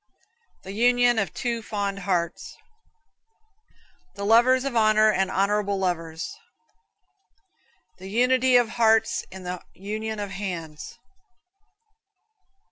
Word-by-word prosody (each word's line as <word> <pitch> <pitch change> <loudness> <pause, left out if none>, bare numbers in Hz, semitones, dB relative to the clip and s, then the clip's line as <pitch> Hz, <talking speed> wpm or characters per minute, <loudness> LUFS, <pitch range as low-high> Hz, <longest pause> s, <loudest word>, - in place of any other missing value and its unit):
The 190 - -8
union 245 +2 +3
of 195 -6 -2
two 235 -2 -3
fond 200 -2 -3
hearts. 180 -3 -3 1.6
The 200 - -5
lovers 250 +4 +4
of 275 -3 -3
honor, 215 -1 +4
and 190 -2 0
honorable 200 +1 0
lovers. 165 -3 -3 1.7
The 190 +1 -9
unity 250 +3 +3
of 245 -1 +5
hearts 225 -1 +2
in 190 0 -10
the 180 0 -5
union 215 +3 -5
of 205 -1 -5
hands. 170 -6 -6
205 Hz, 105 wpm, -24 LUFS, 190-230 Hz, 1.7 s, of